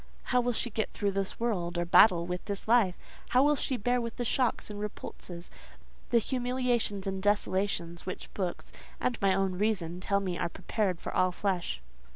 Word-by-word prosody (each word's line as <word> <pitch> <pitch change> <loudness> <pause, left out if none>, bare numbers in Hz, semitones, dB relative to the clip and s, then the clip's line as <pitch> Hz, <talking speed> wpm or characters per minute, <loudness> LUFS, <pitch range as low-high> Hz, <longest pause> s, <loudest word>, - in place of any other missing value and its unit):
"How 250 - +5
will 245 0 +1
she 240 +1 -1
get 220 +1 -1
through 200 -1 0
this 195 0 -2
world, 180 -7 -1
or 175 - 0
battle 170 0 +6
with 180 0 -4
this 200 0 -5
life? 220 -6 +4 0.3
How 255 +2 +5
will 295 +1 +4
she 265 -2 -1
bear 245 +3 +1
the 235 +1 -4
shocks 245 -2 0
and 205 - -6
repulses, 180 -4 -7 0.6
the 240 - +4
humiliations 245 -4 0
and 190 -1 -2
desolations, 190 -4 0
which 185 - -6
books, 185 -3 -4 0.3
and 245 -3 -1
my 195 -1 +4
own 190 -1 0
reason, 190 -5 0
tell 200 +2 +1
me 185 -3 -3
are - - 0
prepared 185 0 -1
for - - -5
all 185 0 +3
flesh?" 175 - -2
200 Hz, 185 wpm, -30 LUFS, 180-235 Hz, 0.6 s, battle